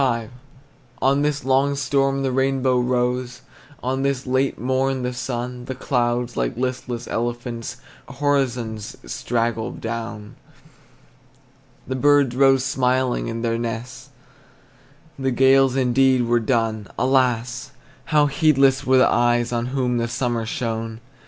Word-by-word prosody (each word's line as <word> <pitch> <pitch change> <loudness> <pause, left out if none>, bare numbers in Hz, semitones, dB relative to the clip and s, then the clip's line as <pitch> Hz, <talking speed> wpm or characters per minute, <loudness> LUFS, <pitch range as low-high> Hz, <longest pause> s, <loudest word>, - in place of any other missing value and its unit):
V. 115 -4 0 0.7
On 135 +2 +2
this 145 -1 -1
long 135 +2 +2
storm 135 0 0
the 135 - 0
rainbow 130 -1 +1
rose, 125 0 -1 0.4
On 130 +2 -1
this 135 -1 -1
late 130 +1 0
morn 130 +1 0
the 125 0 -2
sun; 125 0 -4
The 130 - -5
clouds, 120 -2 -1
like 120 - -2
listless 125 -1 -3
elephants, 120 0 -4 0.4
Horizons 125 -7 -1
straggled 115 - -2
down. 115 -2 -6 1.5
The 130 - -2
birds 140 -2 +3
rose 135 -1 +4
smiling 130 -2 0
in 115 0 -4
their 115 0 0
nests, 115 +1 -5 1.1
The 135 0 0
gales 135 +1 +4
indeed 130 0 +3
were 120 0 +2
done; 110 -3 -1
Alas! 125 0 +1 0.4
how 150 -2 +3
heedless 140 -2 +3
were 130 0 +3
the 130 - +6
eyes 120 0 +2
On 120 0 -1
whom 125 -2 0
the 115 - -1
summer 120 -2 -2
shone! 115 -2 -3
125 Hz, 125 wpm, -22 LUFS, 120-135 Hz, 1.5 s, the